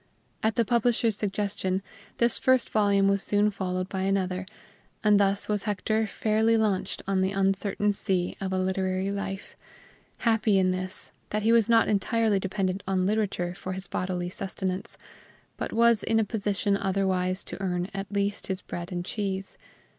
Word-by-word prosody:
At 220 0 +1
the 235 - +2
publisher's 235 -1 +2
suggestion, 195 -2 -1 0.3
this 235 0 +2
first 260 -1 +3
volume 200 -2 +3
was 200 0 +2
soon 205 +1 +2
followed 185 -2 -2
by 190 -1 -3
another; 190 -1 0 0.6
and 210 -1 +5
thus 200 0 +2
was 210 0 -1
Hector 215 +1 0
fairly 220 +2 +2
launched 210 -4 0
on 195 -1 +2
the 190 - +2
uncertain 195 +1 +1
sea 185 -2 -1
of 190 -1 -2
a 190 - 0
literary 185 +1 0
life; 195 -1 -5 0.6
happy 220 -3 +2
in 185 -1 +3
this, 185 0 -4 0.2
that 210 0 -1
he 225 - +4
was 230 -1 +4
not 230 -1 +5
entirely 215 0 +2
dependent 190 0 -1
on 190 -1 +1
literature 195 -4 0
for 185 0 -5
his 190 +1 -6
bodily 180 -1 -2
sustenance, 190 -1 -4 0.6
but - - -4
was 235 -1 +4
in 225 0 +2
a 220 - +2
position 205 -1 0
otherwise 190 -1 0
to - - -7
earn 180 -2 -1
at 195 0 -5
least 200 0 -1
his 190 -1 -3
bread 175 +2 -6
and 175 -1 -3
cheese. 195 -2 -3
195 Hz, 165 wpm, -27 LUFS, 190-210 Hz, 0.6 s, and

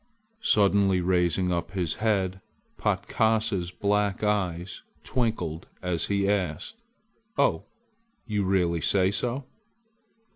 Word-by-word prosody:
Suddenly 100 - +3
raising 90 0 +1
up 85 +1 -2
his 90 -5 -1
head 95 -4 0 0.3
Patkasa's 110 -5 0
black 100 +2 0
eyes 95 -4 -1 0.2
twinkled 95 -10 -2 0.2
as 90 -2 0
he 100 -1 +1
asked: 100 - -2 0.6
"Oh, - - +2 0.6
you 105 -3 -1
really 90 -3 +1
say 95 +2 +3
so?" 125 +6 -2
95 Hz, 100 wpm, -27 LUFS, 90-105 Hz, 0.6 s, Suddenly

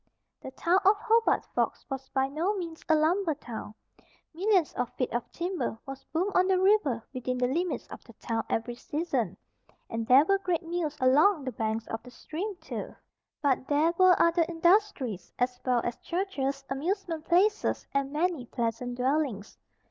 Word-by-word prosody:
The - - -7
town 340 +7 +2
of 400 +2 +5
Hobart 455 +1 +2
Forks - - -1
was 270 -1 -6
by 265 0 +1
no 330 +9 -1
means 335 -3 -6
a 315 - +6
lumber 320 +2 +2
town. 225 -6 -8 0.6
Millions 370 -1 +2
of 245 -1 -2
feet 255 - -2
of 240 0 -3
timber 350 -8 -3
was 270 -1 -8
boomed 365 +5 -1
on 365 +1 +4
the 380 -1 +3
river 375 - +3
within 255 -1 -2
the 250 - +1
limits 335 +8 -1
of - - -10
the - - -14
town 225 -2 -3
every 230 +2 -1
season, 250 - -2 0.5
and 225 0 -3
there 270 +4 +7
were 390 +3 +2
great 360 -3 -1
mills 330 -3 -3
along 290 +6 +4
the 260 - -3
banks 220 0 -2
of 225 - -5
the 250 - -13
stream, 350 - -5
too. 360 - -7 0.5
But 265 -2 +1
there 305 +3 +3
were 370 0 +5
other 335 0 +4
industries, 335 - +1
as 250 0 -1
well 250 -2 +2
as 240 - -3
churches, 280 -7 -3
amusement 330 +3 -2
places 405 +5 +2
and 275 0 0
many 310 -4 -1
pleasant 240 +1 -2
dwellings. 255 -5 -1
300 Hz, 170 wpm, -28 LUFS, 250-360 Hz, 0.6 s, there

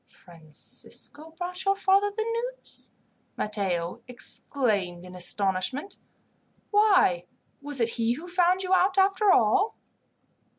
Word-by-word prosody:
"Francisco 170 - -9
brought 360 +1 -4
your 390 0 +2
father 390 +1 +3
the 430 +2 -2 0.3
news!" - - -8 0.5
Matteo 195 -1 -1
exclaimed 210 -8 -1
in 180 - -11
astonishment. 195 - -1 0.7
"Why, 380 - +4 0.3
was 290 -1 -4
it 230 -1 +2
he 230 0 0
who 315 +8 -8
found 360 +1 +2
you 370 0 0
out, 375 +2 +3
after 390 +1 +4
all?" 385 - +3
285 Hz, 115 wpm, -27 LUFS, -, 0.7 s, Why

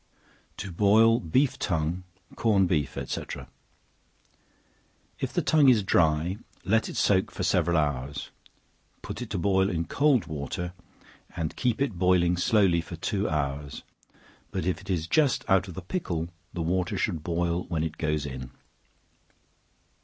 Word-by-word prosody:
To 100 -1 -5
Boil 110 +5 +5
Beef 130 - +1
Tongue, 85 0 -1 0.3
Corned 100 -5 +3
Beef 75 -6 -1
&c. - - -3 2.0
If - - -2
the - - 0
tongue 150 -4 +5
is 115 -5 +4
dry, 80 0 +2 0.3
let 110 +3 +2
it - - -6
soak 95 -2 +3
for - - -5
several 85 -1 +2
hours, 70 -2 -2 0.7
put - - -6
it - - -5
to - - -2
boil 95 +1 +2
in 85 -3 -1
cold 140 - +2
water, 85 +4 -4 0.6
and 80 -2 -3
keep 125 -1 0
it 130 -11 -1
boiling 90 -1 +3
slowly 90 -2 +3
for 85 - -8
two 100 +4 -1
hours; 70 -2 -3 0.7
but - - -3
if 90 +1 -1
it 100 - -14
is 85 -4 0
just 140 - +2
out 95 -1 +3
of 90 - -9
the 95 - -6
pickle, 85 - -3 0.2
the 85 - -3
water 90 +2 0
should 85 -8 -1
boil 85 +2 -1
when 80 -3 -1
it 80 -1 -4
goes 75 -2 0
in. 65 -2 -6
90 Hz, 150 wpm, -27 LUFS, 80-100 Hz, 2.0 s, Boil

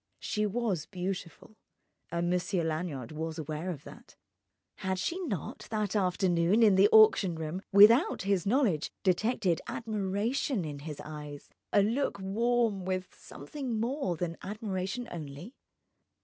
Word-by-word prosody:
She 210 0 -1
was 205 -7 -1
beautiful—and 180 -1 -6
Monsieur 180 0 0
Lanyard 155 -6 -3
was 160 +1 -4
aware 155 +3 -4
of 155 -6 -5
that. - - -14 0.6
Had 190 0 -2
she 335 - -2
not, 195 - -5
that 215 -2 -1
afternoon, 185 +1 +2
in 210 -3 +6
the 195 +2 +6
auction 215 -5 +6
room, 160 +3 -4
without 210 - +6
his 195 -3 +1
knowledge 215 - +1
detected 190 -1 +1
admiration 215 - -1
in 145 -2 -6
his 150 0 -7
eyes, 150 -2 -9 0.2
a 205 - +5
look 235 +5 0
warm 220 +1 +1
with 185 0 -3
something 260 -7 -6
more 235 - -1
than 170 -1 -3
admiration 205 +2 -4
only? 155 - -8
190 Hz, 130 wpm, -30 LUFS, 170-220 Hz, 0.6 s, in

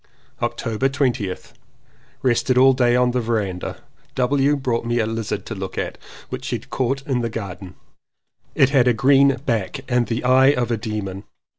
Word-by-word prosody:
^ - - -3
October 115 +4 -1
20th. 125 -9 -2 0.7
Rested 125 0 +2
all 135 +1 +7
day 120 -2 +2
on 125 0 +3
the 125 0 0
verandah. 105 -6 -3 0.3
W. 140 +3 +2
brought 125 -5 -1
me 120 +1 -1
a 115 - +2
lizard 115 -1 -3
to - - -5
look 95 -2 -6
at, - - -3 0.3
which - - -6
he - - -1
had - - -9
caught 135 +1 -1
in 130 -3 0
the 115 - -2
garden. 95 -4 -7 0.8
It 135 - +4
had 130 -3 +4
a 125 - +5
green 135 +3 +4
back 115 +3 -1
and 125 -2 +1
the 115 +1 -2
eye 130 +2 +5
of 120 -3 -1
a - - +2
demon. 105 -3 -5
120 Hz, 180 wpm, -21 LUFS, 110-130 Hz, 0.8 s, all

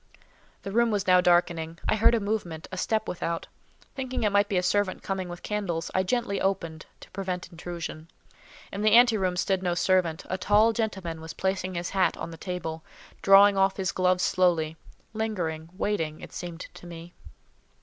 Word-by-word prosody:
The 195 - -5
room 235 +2 +3
was 205 -2 0
now 180 -1 +5
darkening. 170 -2 +2
I - - +3
heard 220 +2 +5
a - - +1
movement, 200 -6 -3
a - - -4
step 215 +4 -1
without. 170 -1 -3 0.5
Thinking 260 -3 -3
it 210 - +2
might 205 0 +3
be 195 - +1
a 180 - +1
servant 195 +1 0
coming 190 -2 -3
with 175 0 -8
candles, 195 -6 -3
I 185 - +3
gently 200 0 -1
opened, 170 -5 -2
to - - -14
prevent 185 -2 -4
intrusion. 165 -1 -7 0.6
In 200 - -4
the 215 0 +4
ante 240 -1 +7
room 185 -3 0
stood 190 0 +1
no 175 -2 0
servant: 175 -3 +1
a 185 - -3
tall 210 +4 +4
gentleman 190 -8 -3
was 160 -1 -7
placing 190 -1 -2
his 175 +1 -3
hat 190 -1 +2
on - - -6
the 165 - -9
table, 165 -3 -5 0.4
drawing 195 +1 +7
off 195 0 +2
his 190 -3 -1
gloves 185 0 +2
slowly—lingering, 170 0 -1
waiting, 165 -8 -1
it - - -10
seemed 175 -1 -6
to 175 - -12
me. 170 0 -10
185 Hz, 180 wpm, -27 LUFS, 170-205 Hz, 0.6 s, ante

